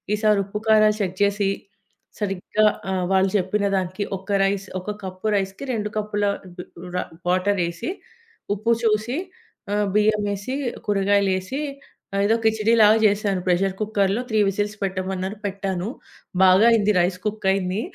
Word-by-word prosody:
ఈసారి 210 -1 +3
ఉప్పు, 200 +2 -5
కారాలు 215 -1 +5
చెక్ 185 -2 -2
చేసి 200 0 +1 0.7
సరిగ్గా 205 +1 0 0.3
ఆహ్, 185 -1 0
వాళ్లు 190 0 +3
చెప్పిన 200 +2 0
దానికి 185 +2 -2
ఒక 190 +2 -17
రైస్, 195 0 0
ఒక 210 +3 -5
కప్ 185 +1 -8
రైస్‌కి 195 +4 -3
2 210 -2 -2
కప్పుల 210 -1 -1 0.3
డు 180 - -7 0.3
రా - - 0 0.3
వాటరేసి 185 - 0 0.6
ఉప్పు 215 +3 0
చూసి 220 +4 +1 0.6
ఆహ్, 205 -1 +1
బియ్యమేసి 210 +2 +1 0.3
కూరగాయలేసి 200 +4 +1 0.6
ఏదో 220 +2 +3
కిచిడీ 220 0 +2
లాగా 215 0 +7
చేశాను. 205 -2 +2
ప్రెషర్ 185 +2 +2
కుక్కర్‌లో 210 0 +1
3 215 -1 +1
విసిల్స్ 205 +2 -1
పెట్టమన్నారు, 190 +1 -3
పెట్టాను. 195 -1 -3 0.5
బాగా 190 +3 +6
అయింది. 215 -2 +3
రైస్ 180 +1 +2
కుక్ 215 -1 -3
అయింది. 190 +1 -1
200 Hz, 135 wpm, -23 LUFS, 190-210 Hz, 0.7 s, లాగా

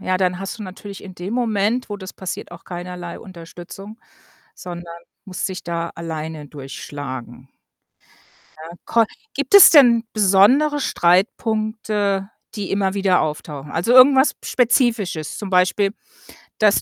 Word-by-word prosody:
ja, 185 0 0
dann 180 -1 0
hast 195 +3 -6
du - - -7
natürlich 195 +1 -9
in 190 -2 -11
dem 185 +5 -5
Moment, 230 0 0
wo 205 - -5
das 190 -1 -9
passiert, 190 -2 -7
auch 170 - -12
keinerlei 175 -1 -7
Unterstützung, 185 +3 -11 0.6
sondern 175 -1 -9 0.3
musst 185 +1 -4
dich 185 -1 -7
da 170 0 -4
alleine 160 -2 -6
durchschlagen. 135 -3 -8 1.1
Ja, 165 +2 -11
ko 230 -1 +3 0.3
gibt 280 +6 -3
es 400 - +11
denn 245 -6 +6
besondere 215 +9 +4
Streitpunkte, 205 0 0 0.3
die 205 -3 -5
immer 195 -1 0
wieder 190 -2 +2
auftauchen? 150 -2 -5
Also, 175 +10 0
irgendwas 265 +2 +6
Spezifisches, 230 - 0
zum 205 - -6
Beispiel, 190 +3 +2 0.6
dass 210 -1 +3
190 Hz, 130 wpm, -20 LUFS, 170-220 Hz, 1.1 s, es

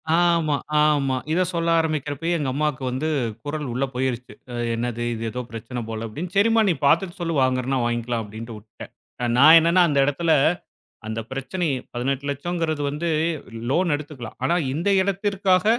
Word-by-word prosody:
ஆமா 170 -3 +3 0.3
ஆமா. 140 -3 +2
இத 175 +3 +2
சொல்ல 170 -2 -1
ஆரம்பிக்கிறப்பயே 155 +1 -1
எங்க 145 -4 -1
அம்மாவுக்கு 150 -1 -1
வந்து 130 +5 -2 0.4
குரல் 150 0 -3
உள்ள 130 +3 0
போயிருச்சு. 125 -1 -2 0.2
அ, - - -6 0.2
என்னது 120 0 -2
இது 115 0 -5
ஏதோ 125 - -4
பிரச்சனை 115 +2 -6
போல 110 0 -4
அப்படின்னு, 165 +11 -6
சரிம்மா 225 +2 +4
நீ - - +3
பார்த்துட்டு 170 +5 +2
சொல்லு 165 -1 -2
வாங்குறன்னா, 130 +1 0
வாங்கிக்கலாம் 120 -1 -1
அப்டின்னு 110 +2 -8
வுட்டேன். 105 +1 -12 0.5
நான் 155 +5 +9
என்னன்னா 170 +3 +4
அந்த 145 -3 0
எடத்துல 160 +4 0 0.8
அந்த 110 +1 -3
பிரச்சனை 135 +7 -3 0.3
18,00,000ங்கிறது 140 +5 -2
வந்து 155 +4 -2 0.6
லோன் 170 +5 +2
எடுத்துக்கலாம். 145 -6 -8
ஆனா, 150 +6 +2 0.2
இந்த 170 +7 0
இடத்திற்காக 195 -1 +1
145 Hz, 150 wpm, -23 LUFS, 125-170 Hz, 0.8 s, நான்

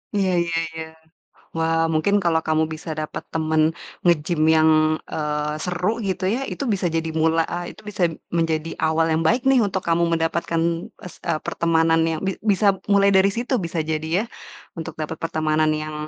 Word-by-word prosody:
Iya 195 -2 +2
iya 170 -1 -1 0.2
iya. 160 0 -5 0.7
Wah, 165 0 +1
mungkin 160 +6 +1
kalau 165 -2 +2
kamu 155 0 +2
bisa 160 +1 -8
dapat 155 0 -5
temen 160 0 +2 0.3
nge-gym 165 -1 +2
yang, 160 0 +5 0.4
eee, 150 0 -2
seru 180 +7 -1
gitu 195 -3 -3
ya, 260 +5 -1
itu - - -5
bisa 185 -2 -1
jadi 165 -1 -1
mula 160 +1 +2
ah 175 0 -3
itu 215 - -11
bisa 210 -3 -5 0.3
menjadi 165 -1 0 0.2
awal 160 +1 +2
yang 160 +1 +1
baik 235 +9 +2
nih 270 - +5
untuk 190 -1 -3
kamu 170 0 +2
mendapatkan 165 0 0 0.4
s 180 - -10
eee, 165 -2 0
pertemanan 165 -1 +2
yang 160 -1 -1
bi 190 0 -2
bisa 200 -2 +2
mulai 200 -1 +4
dari 190 0 +4
situ 245 +2 -1
bisa 170 -3 -2
jadi 155 0 -3 0.2
ya, - - -5 0.5
untuk 160 - -6
dapat 155 +1 -5
pertemanan 155 -1 +1
yang 155 0 -4
165 Hz, 175 wpm, -22 LUFS, 160-185 Hz, 0.7 s, yang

